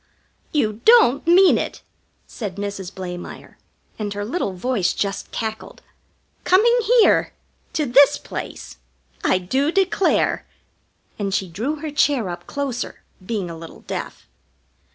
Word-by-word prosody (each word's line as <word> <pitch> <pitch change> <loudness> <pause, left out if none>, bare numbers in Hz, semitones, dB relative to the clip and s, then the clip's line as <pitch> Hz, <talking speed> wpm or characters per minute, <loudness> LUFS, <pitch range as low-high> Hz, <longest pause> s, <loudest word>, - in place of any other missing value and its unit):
"You 220 -7 0
don't 385 - +5
mean 365 +2 +6
it!" - - -5 0.4
said 205 -6 -6
Mrs. 200 -2 -5
Blamire, 180 -2 -8 0.4
and 210 -1 -3
her 205 0 -3
little 230 - -2
voice 190 -1 0
just 200 -1 -3
cackled. 220 -1 -5 0.6
"Coming 440 +6 +4 0.3
here? - - +3 0.4
To 305 - 0
this 275 +2 +5
place? - - -8 0.5
I - - +3
do 265 - 0
declare!" 385 +1 +1 0.7
And 200 -1 -2
she 190 - -1
drew 225 - -3
her 310 -2 -4
chair 280 -8 +1
up 175 0 -7
closer, 275 -4 -4 0.2
being 200 -2 -3
a 170 - -7
little 165 0 -11
deaf. - - -6
220 Hz, 130 wpm, -21 LUFS, 190-290 Hz, 0.7 s, mean